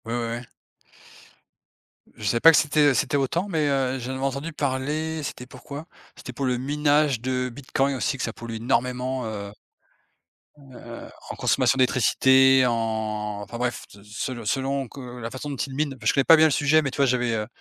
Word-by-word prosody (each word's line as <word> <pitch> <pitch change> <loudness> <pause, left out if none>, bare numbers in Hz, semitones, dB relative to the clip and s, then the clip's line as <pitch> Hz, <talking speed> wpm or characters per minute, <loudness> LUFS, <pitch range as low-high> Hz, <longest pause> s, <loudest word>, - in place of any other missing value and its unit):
Ouais, 115 - -4
ouais, 120 - -1 0.2
ouais. - - -10 1.7
Je - - -12
savais 115 +4 +1
pas 165 - +9
que 160 - +4
c'était 150 -1 +3
c'était 125 - 0
autant, 165 +8 -1
mais 160 -6 0
heu, 135 -1 0
j'en 125 +2 -5
avais 130 - -5
entendu 140 +4 -3
parler, 150 +3 -2
c'était 125 -2 -6
pourquoi? 140 +4 -9 0.3
C'était 125 - -9
pour 135 +3 -3
le 125 -1 0
minage 145 -1 +1
de 125 0 -1
Bitcoin 135 +2 -1
aussi 135 +2 -1
que - - -4
ça 115 - -3
pollue 115 -1 -7
énormément, 125 +2 -1
heu 100 -2 -6 1.1
heu, 125 -4 -11 0.2
en - - -5
consommation 135 - +2
d'électricité, 130 +1 +4
en 110 -3 -2
enfin 120 +4 -8
bref, 120 0 -2
de 100 - -16
se 105 0 -8
selon 120 -3 -8
selon 135 +4 -1
que - - -11 0.2
la 115 0 -6
façon 130 +3 -6
dont 140 - -4
il 135 +1 -4
mine, 145 0 -2
je - - +2
connais 140 - +3
pas 165 - +9
bien 160 0 +6
le - - -1
sujet, 150 +3 +3
mais 140 -3 -3
tu - - -8
vois? 140 - +4
J'avais, 125 -2 +1
heu, 105 -1 -2
130 Hz, 200 wpm, -24 LUFS, 120-140 Hz, 1.7 s, pas